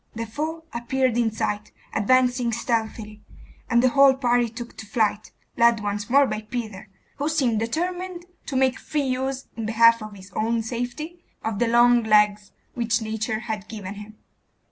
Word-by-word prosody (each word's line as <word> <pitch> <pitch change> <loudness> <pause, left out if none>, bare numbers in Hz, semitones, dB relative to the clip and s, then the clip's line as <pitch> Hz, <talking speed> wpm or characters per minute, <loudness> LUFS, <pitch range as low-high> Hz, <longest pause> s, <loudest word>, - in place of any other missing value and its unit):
The 230 0 -3
foe 310 +8 -4
appeared 245 +1 0
in 235 -2 +2
sight, 210 -1 -3 0.2
advancing 245 +2 +2
stealthily, 220 -2 -2 0.5
and 235 +1 +3
the 255 - +5
whole 275 +1 +6
party 245 -2 +2
took 235 +1 -9
to 220 - -8
flight, 215 -2 0 0.3
led 235 -1 +5
once 205 0 -3
more 280 +3 +6
by 215 - -3
Peter, 215 -3 -6 0.3
who 295 +1 -1
seemed 260 -9 +1
determined 350 +8 -3 0.2
to 275 - -4
make 260 0 +2
free 300 -1 -2
use, 265 0 -2
in 225 -2 -4
behalf 230 +1 +5
of 215 -1 -8
his 190 0 -13
own 225 +3 0
safety, 250 +9 -5 0.2
of 220 -2 -2
the 240 - +2
long 240 +1 +5
legs 210 -2 +3 0.2
which 230 -1 0
nature 220 0 -3
had 220 -3 -5
given 205 -3 -7
him. 210 +1 -11
235 Hz, 165 wpm, -24 LUFS, 215-255 Hz, 0.5 s, whole